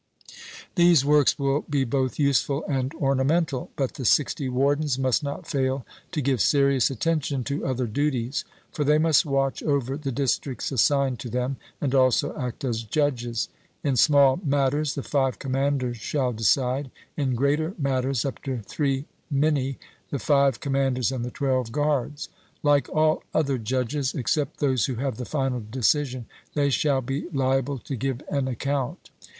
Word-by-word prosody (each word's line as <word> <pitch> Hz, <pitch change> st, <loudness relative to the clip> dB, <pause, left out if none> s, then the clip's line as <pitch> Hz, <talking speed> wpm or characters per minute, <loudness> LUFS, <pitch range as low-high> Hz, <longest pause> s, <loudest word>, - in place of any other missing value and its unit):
These 170 Hz, -6 st, +5 dB
works 145 Hz, -1 st, +4 dB
will 140 Hz, +1 st, +1 dB
be 140 Hz, -2 st, +1 dB
both 130 Hz, +1 st, -1 dB
useful 140 Hz, 0 st, +1 dB
and 135 Hz, -2 st, -1 dB
ornamental; 140 Hz, 0 st, +1 dB
but 135 Hz, -3 st, -1 dB
the 130 Hz, -, -6 dB
sixty 135 Hz, +2 st, +2 dB
wardens 140 Hz, +2 st, +1 dB
must 130 Hz, 0 st, +1 dB
not 145 Hz, +4 st, -5 dB
fail 135 Hz, -3 st, -1 dB, 0.3 s
to 150 Hz, -5 st, -2 dB
give 130 Hz, -4 st, +1 dB
serious 140 Hz, -1 st, +3 dB
attention 140 Hz, 0 st, -1 dB
to 140 Hz, +3 st, -3 dB
other 130 Hz, -1 st, -1 dB
duties. 130 Hz, +1 st, -1 dB, 0.3 s
For 150 Hz, -, -2 dB
they 150 Hz, +1 st, +4 dB
must 155 Hz, -1 st, +3 dB
watch 135 Hz, -1 st, 0 dB
over 135 Hz, -3 st, 0 dB
the 145 Hz, -3 st, -4 dB
districts 135 Hz, +1 st, -1 dB
assigned 135 Hz, 0 st, +2 dB
to 120 Hz, -, -6 dB
them, 125 Hz, +3 st, -2 dB, 0.2 s
and 140 Hz, -3 st, -1 dB
also 130 Hz, -2 st, +3 dB
act 125 Hz, 0 st, -5 dB
as 120 Hz, -4 st, -1 dB
judges. 120 Hz, -2 st, -1 dB, 0.4 s
In 140 Hz, -2 st, +1 dB
small 140 Hz, +2 st, +5 dB
matters 145 Hz, 0 st, +1 dB
the 140 Hz, -, -4 dB
five 135 Hz, -3 st, 0 dB
commanders 135 Hz, -2 st, -1 dB
shall 125 Hz, +2 st, -1 dB
decide: 130 Hz, +4 st, +1 dB, 0.3 s
in 135 Hz, -4 st, 0 dB
greater 150 Hz, -, 0 dB
matters 135 Hz, -3 st, 0 dB
up 135 Hz, -, -4 dB
to 135 Hz, -2 st, -2 dB
three 135 Hz, +4 st, -1 dB, 0.3 s
minae, 140 Hz, -2 st, +1 dB, 0.3 s
the 140 Hz, -, -2 dB
five 140 Hz, -2 st, +2 dB
commanders 135 Hz, -3 st, 0 dB
and 130 Hz, -3 st, -3 dB
the 125 Hz, -, -3 dB
twelve 130 Hz, -3 st, -1 dB
guards. 145 Hz, 0 st, -1 dB, 0.4 s
Like 145 Hz, -1 st, +3 dB
all 155 Hz, 0 st, +2 dB
other 140 Hz, -4 st, +1 dB
judges, 130 Hz, +4 st, -1 dB
except 140 Hz, +3 st, -1 dB
those 130 Hz, -5 st, +2 dB
who 130 Hz, -, -3 dB
have 130 Hz, -1 st, -2 dB
the 125 Hz, -, -5 dB
final 135 Hz, -4 st, -1 dB
decision, 130 Hz, +1 st, 0 dB, 0.3 s
they 140 Hz, -1 st, +2 dB
shall 135 Hz, 0 st, +2 dB
be 135 Hz, +6 st, -4 dB
liable 135 Hz, -1 st, 0 dB
to 135 Hz, +2 st, -6 dB
give 130 Hz, +2 st, -2 dB
an 140 Hz, -2 st, 0 dB
account. 135 Hz, +1 st, -3 dB
135 Hz, 160 wpm, -25 LUFS, 130-145 Hz, 0.4 s, These